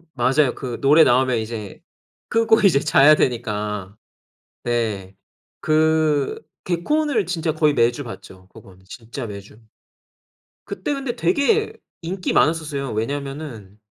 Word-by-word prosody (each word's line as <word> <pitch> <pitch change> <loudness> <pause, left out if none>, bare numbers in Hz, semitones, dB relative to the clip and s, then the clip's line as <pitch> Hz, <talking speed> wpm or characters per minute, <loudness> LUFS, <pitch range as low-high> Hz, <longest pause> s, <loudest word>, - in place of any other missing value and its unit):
맞아요. 130 +2 +2
그 125 -3 -6
노래 150 +3 +6
나오면 125 0 +3
이제 110 -3 -7 0.5
끄고 225 -1 +3
이제 185 -9 +4
자야 150 0 +5
되니까. 105 -6 -2 0.7
네 110 -6 -2 0.5
그 155 -2 +1 0.2
개콘을 230 - 0
진짜 165 -3 -2
거의 155 -1 +2
매주 120 +1 +1
봤죠. 95 -6 -11
그건 95 -1 -17
진짜 120 +4 -8
매주. 100 +2 -11 1.0
그때 190 +11 -4
근데 265 -3 -4
되게 420 - +1 0.3
인기 180 +2 -3
많았었어요. 150 -5 0
왜냐하면은 135 -4 -5
140 Hz, 245 characters per minute, -21 LUFS, 115-165 Hz, 1.0 s, 노래